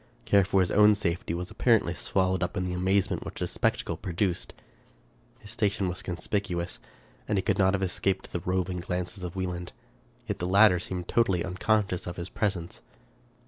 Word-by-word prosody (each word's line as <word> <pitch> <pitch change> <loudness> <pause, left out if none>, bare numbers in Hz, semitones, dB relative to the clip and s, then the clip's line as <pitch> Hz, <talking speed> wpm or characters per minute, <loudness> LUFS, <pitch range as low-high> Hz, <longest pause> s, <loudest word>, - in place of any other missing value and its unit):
Care 100 -1 +5
for 95 0 +3
his 90 - 0
own 105 0 +6
safety 85 -4 -2
was 90 +1 -5
apparently 110 -8 +3
swallowed 95 -1 0
up 90 - -2
in 90 - -1
the 90 - -2
amaze 95 +1 +2
ment - - -2
which - - -8
this - - -2
spectacle - - 0
produced. 90 0 -2 0.9
His - - -12
station 100 -2 0
was 90 0 -3
con 90 - -4
spicuous, 90 -1 -2 0.5
and 105 - +1
he 95 - +1
could - - 0
not 95 0 +4
have 95 - -2
escaped 95 +1 -1
the 85 - -1
roving 90 +1 -1
glances 90 +2 -4
of 90 0 -6
Wieland; 90 -2 -4 0.5
yet - - -3
the 90 - -2
latter 100 -1 +6
seemed 90 0 -5
totally 95 -7 +2
unconscious 95 0 0
of 90 - -5
his 85 +1 -5
presence. 95 -5 -2
95 Hz, 185 wpm, -28 LUFS, 90-100 Hz, 0.9 s, own